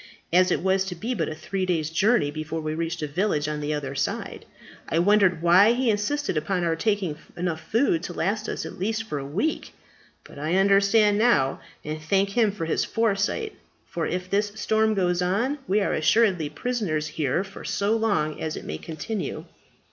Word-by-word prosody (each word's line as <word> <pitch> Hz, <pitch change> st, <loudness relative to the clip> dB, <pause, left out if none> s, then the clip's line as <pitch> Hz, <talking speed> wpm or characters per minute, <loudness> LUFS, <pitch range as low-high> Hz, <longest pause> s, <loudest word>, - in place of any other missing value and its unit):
As 185 Hz, +1 st, +5 dB
it 175 Hz, -, 0 dB
was 190 Hz, 0 st, +2 dB
to 185 Hz, -2 st, -5 dB
be 225 Hz, +9 st, -3 dB
but -, -, -1 dB
a 155 Hz, -, -5 dB
three 190 Hz, +4 st, -3 dB
days' 165 Hz, -4 st, -1 dB
journey 175 Hz, -3 st, +2 dB
before 155 Hz, +1 st, -4 dB
we 155 Hz, -1 st, -3 dB
reached 165 Hz, 0 st, -3 dB
a -, -, -1 dB
village 155 Hz, -1 st, 0 dB
on 150 Hz, 0 st, -3 dB
the 145 Hz, +1 st, -2 dB
other 145 Hz, -3 st, -3 dB
side, 140 Hz, 0 st, -3 dB, 0.4 s
I -, -, 0 dB
wondered 185 Hz, -1 st, +3 dB
why 190 Hz, +6 st, +6 dB
he 245 Hz, -1 st, +2 dB
insisted 245 Hz, -, -1 dB
upon 175 Hz, +4 st, -1 dB
our 165 Hz, -1 st, +1 dB
taking 200 Hz, -2 st, 0 dB
food 150 Hz, -, -20 dB
enough 170 Hz, -2 st, -4 dB
to 210 Hz, -, +1 dB
last 205 Hz, +5 st, -2 dB
us -, -, -4 dB
at -, -, -8 dB
least 220 Hz, +4 st, -1 dB
for 150 Hz, -10 st, -4 dB
a -, -, -5 dB
week. 205 Hz, -, -2 dB, 0.5 s
But -, -, -13 dB
I 155 Hz, +4 st, 0 dB
understand 200 Hz, +2 st, +4 dB
now, 175 Hz, -, +3 dB, 0.2 s
and 155 Hz, +1 st, -4 dB
thank 195 Hz, +5 st, +1 dB
him 220 Hz, -1 st, +3 dB
for 195 Hz, -5 st, -4 dB
his 160 Hz, -, 0 dB
foresight; 225 Hz, -, 0 dB, 0.3 s
for 165 Hz, -2 st, -3 dB
if 180 Hz, 0 st, -3 dB
this 205 Hz, +2 st, 0 dB
storm 220 Hz, 0 st, +1 dB
goes 180 Hz, -2 st, +1 dB
on, 230 Hz, +11 st, 0 dB
we 205 Hz, +2 st, +2 dB
are -, -, 0 dB
assuredly 170 Hz, -1 st, +2 dB
prisoners 170 Hz, -4 st, -2 dB
here 150 Hz, +2 st, -1 dB
for 195 Hz, 0 st, -11 dB
so 205 Hz, +2 st, 0 dB
long 200 Hz, -9 st, 0 dB
as 155 Hz, -, -3 dB
it -, -, -8 dB
may 80 Hz, -, -5 dB
continue." 165 Hz, +2 st, -5 dB
185 Hz, 195 wpm, -25 LUFS, 155-210 Hz, 0.5 s, why